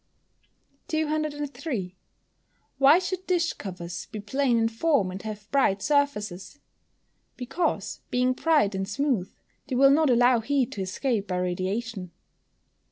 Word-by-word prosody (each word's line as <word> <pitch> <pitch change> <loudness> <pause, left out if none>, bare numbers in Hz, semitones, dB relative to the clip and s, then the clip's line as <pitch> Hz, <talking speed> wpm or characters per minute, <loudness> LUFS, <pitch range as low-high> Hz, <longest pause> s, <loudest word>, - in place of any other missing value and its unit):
203. 295 - -2 0.8
Why 280 +4 +7
should 370 0 -3
dish 345 -2 +1
covers 175 -3 -7
be 220 -2 -7
plain 245 +4 +1
in 225 0 +3
form, 225 - +1
and 190 +1 -7
have 210 -1 -8
bright 205 -8 +2
surfaces? 215 -8 -1 0.8
Because, 270 +7 -2
being 250 +1 +2
bright 295 -7 +2
and 190 0 -2
smooth, 225 -5 -1 0.4
they 265 - -2
will 275 +2 +6
not 305 +1 +4
allow 245 0 +5
heat 265 +2 0
to 205 - -5
escape 205 +3 -1
by 180 - -2
radiation. 185 +3 -3
245 Hz, 125 wpm, -26 LUFS, 195-285 Hz, 0.8 s, Why